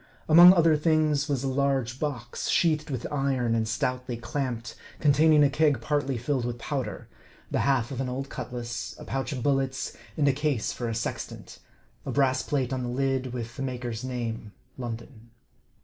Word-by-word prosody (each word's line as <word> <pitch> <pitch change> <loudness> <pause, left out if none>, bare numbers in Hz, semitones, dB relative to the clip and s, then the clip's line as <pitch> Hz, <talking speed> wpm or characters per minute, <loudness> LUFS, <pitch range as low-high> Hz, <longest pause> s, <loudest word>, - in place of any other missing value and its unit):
Among 175 +3 +10
other 165 -3 +4
things, 155 -1 +2
was 140 -3 0
a - - 0
large 135 -2 0
box, 125 -6 -3
sheathed 155 -3 +2
with 130 -4 -3
iron 135 -5 0
and 110 -1 +1
stoutly 125 +2 -2
clamped, 120 0 -3 0.3
containing 150 +1 +5
a 145 - +5
keg 150 -1 +3
partly 145 -3 -1
filled 125 +2 -1
with 120 0 -3
powder, 135 +2 -4 0.4
the - - +1
half 135 -3 +1
of 135 -1 -3
an 130 - -2
old 135 +2 -4
cutlass, 120 -3 -5
a - - -10
pouch 135 +2 -3
of 130 -4 -4
bullets, 135 -2 0 0.2
and 145 -2 +3
a 140 - +4
case 145 -4 -1
for 120 -2 -3
a 115 - -2
sextant 115 - -5 0.4
a - - -6
brass 130 -2 +2
plate 135 -3 -1
on 130 - -2
the 125 - -3
lid, 130 0 -1
with 120 -1 -5
the - - -4
maker's 125 -3 -4
name, 115 -4 -4 0.2
London. 115 -1 -7
130 Hz, 180 wpm, -27 LUFS, 120-145 Hz, 0.4 s, Among